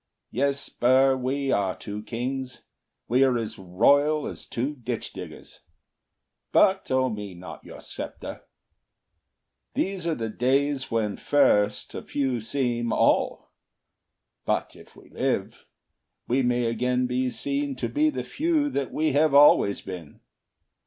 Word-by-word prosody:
Yes, 140 +3 0
Burr, 130 +2 +3
we 135 +1 -1
are 95 -2 0
two 105 0 -6
kings; 125 +4 -5 0.4
We 125 +3 +4
are 130 -2 +3
as 110 -2 -4
royal 140 +12 +3
as - - -6
two 130 +5 -2
ditch 120 -3 -5
diggers; - - -10 0.9
But 190 0 +3
owe 130 0 +2
me 105 -3 -6
not 90 +1 -10
your - - -11
sceptre. - - -7 1.3
These 190 -3 -1
are 165 - +1
the 115 -1 -3
days 135 +4 0
When 110 -3 -1
first 105 -8 +2
a - - -5
few 130 -4 -2
seem 120 -1 -1
all; - - +1 0.9
but - - -1
if - - -16
we - - -17
live, - - -2 0.6
We 130 +3 +2
may 120 -1 +1
again 125 +2 0
be 125 +1 0
seen 140 +2 -2
to 125 - -2
be 305 +1 +2
the 300 - -4
few 310 -2 0
That 140 - -2
we 155 0 +1
have 145 +1 +3
always 140 -8 +6
been. 90 -6 -9
130 Hz, 140 wpm, -26 LUFS, 115-140 Hz, 1.3 s, always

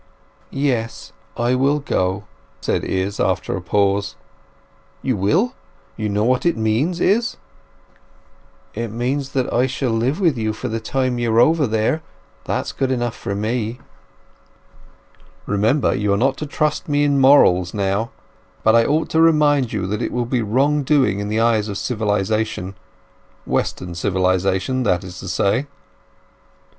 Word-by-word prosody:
"Yes—I 120 -2 -2
will 135 +3 +2
go," 95 -9 -1 0.4
said - - -1
Izz, 95 +2 -2
after - - 0
a - - -4
pause. 100 0 0 0.9
"You 130 - 0
will? 165 - +1 0.4
You 110 -1 -3
know 105 +1 0
what 125 +2 +2
it 170 -7 +1
means, 115 +11 0
Izz?" 225 +7 +1 1.4
"It 115 +2 -3
means 130 +5 -3
that 130 -2 -1
I 125 +2 +3
shall 130 -1 -2
live 120 - 0
with 165 - +2
you 110 -1 -1
for 125 +3 -5
the 115 +1 -2
time 130 +2 -1
you 120 -1 0
are 115 - +3
over 155 +3 +4
there—that's 110 +9 -3
good 135 - -1
enough 120 -3 -1
for 100 - -4
me." 110 +2 -2 1.7
"Remember, 110 +8 +1
you 105 0 0
are - - +2
not 135 +5 +2
to 150 - -5
trust 150 +1 -1
me 145 0 +2
in 145 -1 +2
morals 90 -11 +5
now. 100 +2 -1 0.5
But 110 +1 +5
I 115 - +6
ought 155 +2 0
to 160 - +3
remind 150 -6 +3
you 100 -3 -2
that 105 +2 -3
it - - -2
will 120 -1 -1
be 125 0 0
wrong 135 +7 +1
doing 135 -8 +2
in 100 - -3
the 110 +1 0
eyes 115 -2 +2
of 100 - -4
civilization—Western 105 -5 -3
civilization, 95 +6 0
that 90 -8 +1
is 90 0 -9
to 95 - -8
say." 100 +9 0
115 Hz, 150 wpm, -20 LUFS, 105-135 Hz, 1.7 s, I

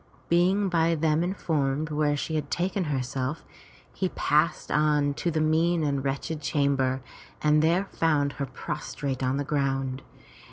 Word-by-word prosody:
Being 185 +4 +3
by 165 -2 +2
them 160 +1 +2
informed 155 -5 -1
where 150 -1 +1
she 160 - -3
had 150 -2 -2
taken 185 +1 -1
herself, 135 0 -2 0.5
he 185 - -1
passed 150 +1 +1
on 150 -1 +2
to 170 - -2
the 160 -1 0
mean 160 +2 +2
and 140 -2 0
wretched 140 +3 -3
chamber, 135 -2 +1 0.4
and 150 0 +3
there 170 +5 +2
found 150 -6 +1
her 140 - -1
prostrate 140 -1 -4
on 130 +1 0
the 145 - -1
ground. 135 -2 -1
150 Hz, 150 wpm, -27 LUFS, 140-165 Hz, 0.5 s, Being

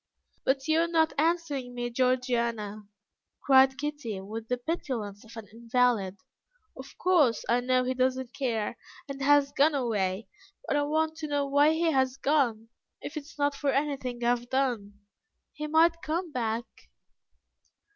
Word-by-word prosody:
"But 270 +1 +1
you 315 +1 +3
are 335 - +2
not 325 -1 +2
answering 300 -6 -1
me, 240 0 -3
Georgiana," 235 -4 -1 0.5
cried 265 -1 +5
Kitty, 290 -9 -4
with 220 +4 -7
the 250 - -1
petulance 245 - -4
of 225 +1 -14
an 220 -2 -8
invalid; 230 -4 0 0.6
"of 265 +1 -11
course, 320 -10 +3
I 240 - +3
know 255 +1 +1
he 255 +1 -1
does 255 0 +1
not 260 -1 -7
care, 235 -4 -2 0.3
and 275 -1 -7
has 285 0 +4
gone 295 +2 +3
away, 210 -6 -1 0.4
but - - 0
I 290 - +2
want 315 +1 0
to 315 -1 -5
know 290 -1 0
why 285 +2 +4
he 325 0 +1
has 260 -2 +1
gone. 250 -7 +1 0.3
If - - -8
it 300 -2 -5
is 300 - -16
not 285 0 +1
for 280 0 -2
anything 270 -4 -1
I 235 - +3
have 240 0 -1
done, 235 -7 -1 0.5
he 300 0 -5
might 330 +2 +3
come 335 +1 -3
back." 230 -2 -2
260 Hz, 165 wpm, -28 LUFS, 235-295 Hz, 0.6 s, cried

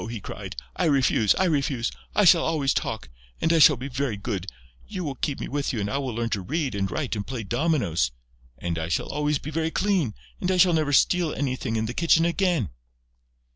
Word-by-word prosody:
he 115 -2 -5
cried. - - -7 0.2
"I - - 0
refuse!... 135 -7 +3
I - - +1
refuse!... 140 -7 0 0.2
I 210 - +4
shall 170 -1 +7
always 150 -4 +1
talk!... 110 - -3 0.3
And 165 - +2
I 165 - +4
shall 150 -1 +8
be 130 +3 -5
very 130 -4 -2
good.... 100 -3 -4 0.4
You 180 - -5
will 145 -4 -3
keep 135 +2 -3
me - - -4
with 145 0 -2
you 115 - -3
and 100 0 -2
I - - -3
shall 140 -1 -1
learn 115 -1 -2
to 100 - -1
read 145 - -2
and 100 -1 -1
write 140 -2 -2
and 105 0 -4
play 125 -2 -4
dominoes!... 115 - +1 0.5
And 85 +4 -3
I 80 - -3
shall 85 - -1
always 150 +1 0
be 150 - -7
very 160 +1 0
clean.... 180 - 0 0.2
And 180 - -1
I 185 - +2
shall 180 -1 +5
never 155 -3 +1
steal 170 +3 +3
anything 130 -4 -2
in 110 0 0
the 115 - -4
kitchen 165 +2 +3
again...." 170 - +1
140 Hz, 220 wpm, -25 LUFS, 110-160 Hz, 0.5 s, shall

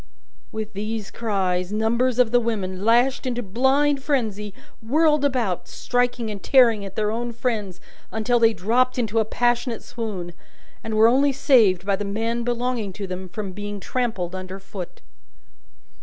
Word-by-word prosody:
With 220 -1 -5
these 215 +1 -4
cries, 190 -5 -1
numbers 235 +3 +1
of 245 -3 +3
the 245 - +5
women, 200 -5 -3
lashed 245 +4 +3
into 245 -1 -2
blind 270 +7 +2
frenzy, 220 -8 -1 0.3
whirled 300 +5 +2
about, 245 -10 0
striking 245 -2 -1
and 200 -2 -7
tearing 235 -6 +4
at 195 -1 -8
their 210 -1 0
own 240 +2 -3
friends 220 -6 -3 0.3
until 230 +2 +1
they 225 -1 +5
dropped 245 +5 +1
into 225 -2 0
a 220 - +2
passionate 240 +1 0
swoon, 195 -7 -5 0.5
and 220 -1 -3
were 220 +1 +7
only 275 +4 +4
saved 230 - +3
by 200 -1 +2
the 205 - -4
men 225 +4 -2
belonging 240 -4 -2
to 200 +1 -5
them 185 0 -6
from 200 +1 -5
being 205 +1 -6
trampled 200 -5 -2
under 185 0 -6
foot. 190 -2 -9
225 Hz, 155 wpm, -23 LUFS, 200-245 Hz, 0.5 s, were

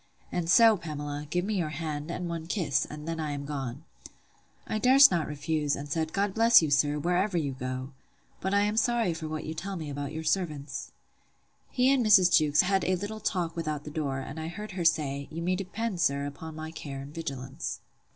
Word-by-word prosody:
And 170 -2 -2
so, 225 +3 +7
Pamela, 145 -3 -5
give 180 +2 0
me 210 -1 -1
your 160 -3 -1
hand, 150 0 -4
and 175 +1 -3
one 165 -1 -5
kiss; 165 -8 0
and 150 +1 -8
then 165 0 -3
I 150 -2 -2
am 140 0 -5
gone. 140 -1 -5 0.8
I 215 - -2
durst 265 +2 +7
not 170 -3 0
refuse, 150 0 -1
and 145 - -6
said, 160 +2 -1
God 200 +1 0
bless 230 +2 +7
you, 155 -3 -1
sir, 145 +1 +3
wherever 180 +4 +1
you 145 -4 0
go!—But 130 +8 -7
I 200 0 +4
am 210 +1 0
sorry 230 -5 +2
for 160 -1 -6
what 155 0 -4
you 160 - -4
tell 195 +4 -5
me 155 -4 -5
about 140 0 -4
your 160 +1 -5
servants! 155 -6 -2 0.8
He 255 0 +3
and 265 -3 +2
Mrs. 195 -5 +6
Jewkes 150 -2 +4
had 190 0 +1
a 185 - +2
little 205 +4 -5
talk 180 -5 -1
without 155 -3 -3
the 150 - -8
door; 145 -3 -2
and 135 +4 -7
I 160 - -4
heard 210 +6 -7
her 180 -2 -3
say, 140 -4 +1
You 165 +2 -5
may 185 +1 +1
depend, 195 +1 -3
sir, 140 -3 +1
upon 155 +2 -7
my 155 0 -6
care 140 -4 -7
and 140 +2 -10
vigilance. 135 -3 -5
160 Hz, 210 wpm, -28 LUFS, 145-185 Hz, 0.8 s, so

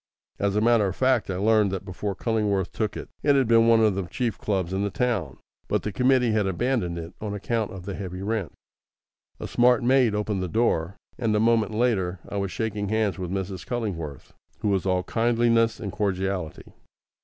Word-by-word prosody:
As 100 0 0
a 105 - +2
matter 115 -2 +4
of 95 - -3
fact, 130 -5 +2
I 95 - -1
learned 105 +1 +3
that 95 0 -4
before 95 +1 -4
Cullingworth 105 -4 0
took 110 -2 -2
it, - - -8
it 145 -1 +3
had 135 -3 +3
been 115 0 +5
one 115 -1 +5
of 110 -2 +4
the 95 -2 -3
chief 120 +3 -2
clubs 95 -4 -1
in 95 - 0
the 100 - 0
town, 100 - -1 0.3
but - - 0
the 105 - -2
committee 125 0 +3
had 105 -2 +1
abandoned 95 -3 -1
it 85 0 -7
on 105 -1 -3
account 110 +1 -1
of 95 -2 -9
the 100 - -4
heavy 95 -1 -6
rent. 105 -7 -2 0.9
A - - -5
smart 125 0 +3
maid 125 -3 +3
opened 105 -2 -1
the 90 - -2
door; 95 -3 0 0.2
and 115 -4 +1
a - - +3
moment 110 -1 +2
later 100 -6 +1
I 100 - -5
was 100 -2 -2
shaking 105 -2 -3
hands 110 -3 0
with 90 -2 -4
Mrs. 95 -1 -4
Cullingworth, 90 - -5 0.3
who 105 - +1
was 95 -1 0
all 90 -1 +1
kindliness 115 0 +2
and 100 - -4
cordiality. 95 -5 -3
105 Hz, 200 wpm, -25 LUFS, 95-115 Hz, 0.9 s, been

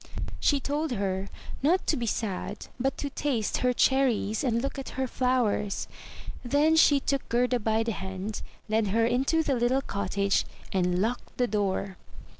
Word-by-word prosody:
She 285 - +3
told 290 +2 -1
her 195 -2 -2 0.3
not 335 +7 +2
to - - +2
be 235 -3 -2
sad, 205 -1 -3
but 270 +2 0
to 285 - -4
taste 255 -7 -1
her 250 - +2
cherries, 250 -4 +2
and 235 -3 +1
look 275 +2 -3
at 270 - -7
her 265 - +1
flowers. 245 -6 0 0.6
Then 290 +5 +3
she 290 -3 +6
took 275 0 -2
Gerda 245 +1 +2
by 220 0 +1
the 230 - -1
hand, 190 +1 -5 0.3
led 215 0 +1
her 225 +4 +2
into 265 +7 +2
the 285 - 0
little 250 +2 +1
cottage, 200 -1 0 0.3
and 180 -2 +1
locked 240 +3 -3
the 250 - +3
door. 195 -3 -1
240 Hz, 165 wpm, -28 LUFS, 205-270 Hz, 0.6 s, she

